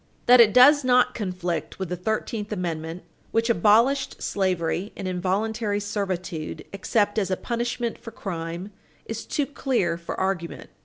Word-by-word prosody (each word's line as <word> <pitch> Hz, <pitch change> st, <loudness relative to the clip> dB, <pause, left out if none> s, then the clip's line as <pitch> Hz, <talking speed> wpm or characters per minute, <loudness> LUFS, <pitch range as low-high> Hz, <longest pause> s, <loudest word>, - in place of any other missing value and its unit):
That 245 Hz, 0 st, +8 dB
it 220 Hz, -2 st, +6 dB
does 285 Hz, +5 st, +7 dB
not 250 Hz, 0 st, +4 dB
conflict 180 Hz, -5 st, -3 dB
with 190 Hz, -3 st, -4 dB
the 180 Hz, -, -2 dB
Thirteenth 215 Hz, +3 st, -3 dB
Amendment, 170 Hz, -3 st, -4 dB, 0.3 s
which 230 Hz, +1 st, +1 dB
abolished 230 Hz, +8 st, +3 dB
slavery 185 Hz, 0 st, -1 dB
and 195 Hz, -, -4 dB
involuntary 205 Hz, +4 st, -1 dB
servitude, 185 Hz, -5 st, -4 dB
except 205 Hz, +2 st, +1 dB
as 195 Hz, -3 st, -1 dB
a 185 Hz, -, 0 dB
punishment 235 Hz, 0 st, -3 dB
for 230 Hz, -, -9 dB
crime, 175 Hz, -2 st, -5 dB, 0.3 s
is 225 Hz, 0 st, -6 dB
too 290 Hz, -, 0 dB
clear 245 Hz, -12 st, -1 dB
for 170 Hz, -, -6 dB
argument. 190 Hz, -3 st, -3 dB
205 Hz, 145 wpm, -25 LUFS, 180-230 Hz, 0.3 s, That